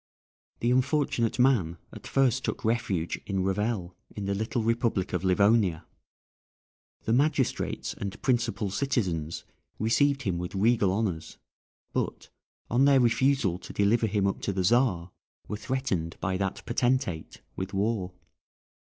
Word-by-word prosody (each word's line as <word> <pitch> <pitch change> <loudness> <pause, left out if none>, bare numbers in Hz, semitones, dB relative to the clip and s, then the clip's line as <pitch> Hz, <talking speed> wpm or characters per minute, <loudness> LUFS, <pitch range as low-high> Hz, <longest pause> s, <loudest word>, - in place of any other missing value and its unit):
The 120 - +2
unfortunate 130 -3 +1
man 120 -11 +3 0.2
at - - -10
first 130 -2 +2
took - - -3
refuge 100 -7 -1
in 95 -2 0
Revel, 95 -1 -1 0.2
in 105 - -4
the 100 - 0
little 110 +3 -1
republic 115 -5 0
of 90 - -1
Livonia. 95 -2 +3 1.2
The 110 - 0
magistrates 140 0 0
and 100 0 -6
principal 120 -6 0
citizens 95 - -1 0.3
received 140 +5 +2
him 90 -5 -1
with 90 +2 -5
regal 105 -1 +3
honours, 95 -6 -2 0.6
but, - - -3 0.4
on 125 +4 +3
their 140 -1 +6
refusal 120 -6 +2
to - - -10
deliver 110 +3 +2
him 100 -1 0
up 100 - -1
to - - -1
the 95 -1 -1
Czar, 95 -5 +2 0.4
were 105 - -4
threatened 110 -10 -2
by 95 - -1
that 95 0 -3
potentate 120 - -1
with 95 +1 -4
war. 100 -2 -1
105 Hz, 135 wpm, -28 LUFS, 95-120 Hz, 1.2 s, their